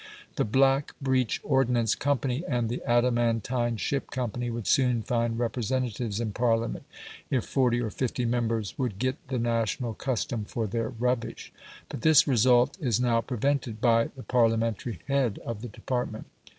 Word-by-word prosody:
The 140 - +1
"Black 135 +5 +2
Breech 130 -4 +1
Ordnance 125 -5 +2
Company" 140 0 -1
and 120 -4 0
the 120 - -3
"Adamantine 120 0 +1
Ship 135 +7 -2
Company" 120 -1 -3
would 115 -2 -4
soon 125 -4 +2
find 115 -1 0
representatives 120 -2 -2
in 115 -2 -2
Parliament, 115 +1 0 0.4
if 130 -4 +1
forty 125 -3 +2
or 115 -3 -2
fifty 125 0 -2
members 115 -3 -1
would 120 -7 -1
get 130 +5 -1
the 130 0 -2
national 115 0 -1
custom 120 -3 -2
for 110 +2 -3
their 115 +2 -2
rubbish. 125 0 -2 0.3
But - - -7
this 155 0 +6
result 125 - +4
is 120 -7 +1
now 120 -2 +2
prevented 125 -2 -1
by 115 -1 +4
the 130 - -9
Parliamentary 115 -2 +1
head 135 -6 +1
of 115 -3 -4
the 120 - -5
department. 120 0 -4
120 Hz, 150 wpm, -27 LUFS, 115-130 Hz, 0.4 s, this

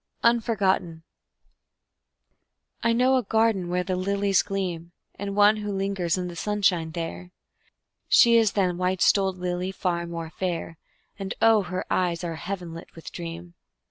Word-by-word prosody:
Unforgotten 195 -8 +1 1.8
I 230 - +2
know 255 +3 +3
a 255 - 0
garden 220 -4 +1
where 180 +1 0
the 185 0 -2
lilies 200 +1 +1
gleam, 175 -4 -4 0.3
And 200 0 -4
one 210 +1 +5
who 210 -1 -4
lingers 195 -3 -1
in 180 -1 -3
the 175 - -7
sunshine 190 -4 +1
there; 170 +2 -6 0.8
She 235 -1 +6
is 225 -3 +4
than 180 -3 0
white 185 0 +1
stoled 190 -2 +3
lily 180 +1 -2
far 175 -3 -2
more 165 -1 -6
fair, 170 -3 -4 0.4
And 195 -1 -4
oh, 225 -2 +5
her 185 -1 -4
eyes 175 -2 0
are 170 -1 -3
heaven 180 -2 -5
lit 165 - -11
with 165 - -10
dream! 170 0 -7
185 Hz, 150 wpm, -25 LUFS, 175-200 Hz, 1.8 s, She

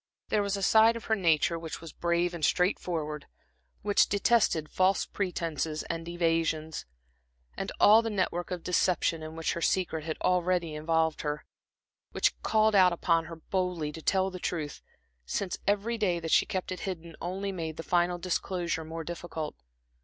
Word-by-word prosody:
There 210 - +2
was 200 0 -1
a 195 - -4
side 225 +2 +6
of 230 - -7
her 220 - +2
nature 165 -3 +2
which 165 -1 -6
was 165 -2 -10
brave 170 +1 0
and 170 -3 -6
straightforward, 160 -4 0 0.6
which 205 0 +3
detested 200 -6 +2
false 185 +4 +2
pretences 165 -5 -2
and 165 0 -5
evasions, 165 - -1 0.7
and - - -4
all 215 +2 +8
the 225 - -3
net 195 -4 0
work 175 0 -4
of 180 -2 -4
deception 175 -2 +1
in 155 0 -7
which 165 0 -1
her 170 - -4
secret 170 -3 0
had 155 0 -4
already 180 -2 +1
involved 160 +1 0
her; 150 0 -3 0.7
which - - +2
called 220 0 +3
out 185 -3 +6
upon 165 -1 +1
her 165 +1 -8
boldly 175 -2 -2
to 160 - -9
tell 190 +3 +1
the 185 - -7
truth, 155 -4 -3 0.5
since 190 -3 -2
every 210 +3 +1
day 180 -5 +1
that 165 -1 -4
she - - +5
kept 185 -1 -3
it 185 - -4
hidden 170 -4 -6
only 190 +3 -3
made 165 -4 -5
the 165 - -5
final 175 0 +1
disclosure 175 -1 -2
more 165 +1 -6
difficult. 165 -2 -5
175 Hz, 175 wpm, -29 LUFS, 160-190 Hz, 0.7 s, all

